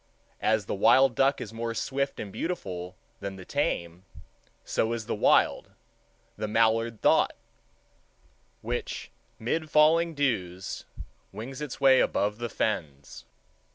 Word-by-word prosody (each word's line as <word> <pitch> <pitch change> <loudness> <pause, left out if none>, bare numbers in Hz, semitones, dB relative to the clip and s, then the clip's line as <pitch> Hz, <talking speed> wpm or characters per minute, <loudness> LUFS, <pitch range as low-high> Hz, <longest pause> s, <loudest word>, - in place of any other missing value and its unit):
As 110 -2 +2
the - - -3
wild 120 +6 +5
duck 135 +3 +2
is - - -7
more 115 0 -3
swift 140 +3 -2
and 100 -2 -6
beautiful 95 - -4 0.2
than 100 -1 -5
the 95 -1 -10
tame, 85 +1 -2 0.6
so 115 +1 0
is 115 -2 -4
the - - -2
wild—the 110 - -1
mallard—thought, 115 +1 +2 1.3
which - - -4 0.3
'mid 155 +8 -2
falling 160 +2 +4
dews 95 -10 -2 0.5
wings 130 +5 -7
its 150 -4 -5
way 135 -1 +6
above 105 +2 +1
the 120 0 -3
fens. 75 -13 -3
115 Hz, 120 wpm, -28 LUFS, 100-135 Hz, 1.3 s, way